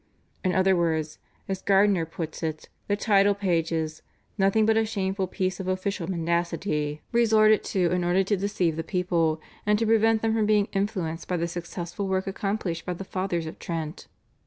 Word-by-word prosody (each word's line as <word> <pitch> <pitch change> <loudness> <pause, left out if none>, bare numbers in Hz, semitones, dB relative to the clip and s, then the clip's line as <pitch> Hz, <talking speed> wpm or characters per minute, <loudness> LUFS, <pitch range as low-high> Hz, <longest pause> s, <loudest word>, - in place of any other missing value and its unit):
In 185 -2 +1
other 190 0 +4
words, 160 -3 -1 0.3
as 190 -1 -3
Gairdner 195 -4 +3
puts 165 -1 -6
it, 155 -2 -4 0.2
the 205 - +2
title 205 -1 +3
page 175 -5 0
is 160 -1 -2 0.3
"nothing 200 +2 +3
but 220 0 +3
a 225 - +3
shameful 195 -3 -2
piece 185 -1 -2
of 190 - -4
official 185 -1 -2
mendacity" 170 -3 -1
resorted 215 -2 +4
to 180 -3 +1
in 180 0 +1
order 180 +2 +3
to 205 +2 +1
deceive 185 -5 0
the 165 - -2
people, 170 -3 0 0.2
and 210 0 +3
to 225 - 0
prevent 225 0 +3
them 225 0 +2
from 220 -2 +1
being 210 -1 +3
influenced 190 -5 -2
by 180 - 0
the 170 0 -1
successful 175 +2 -5
work 190 0 0
accomplished 195 -4 -2
by 180 - -3
the 195 - -6
Fathers 185 -3 -2
of 160 - -8
Trent. 165 +1 -5
185 Hz, 185 wpm, -26 LUFS, 170-205 Hz, 0.3 s, other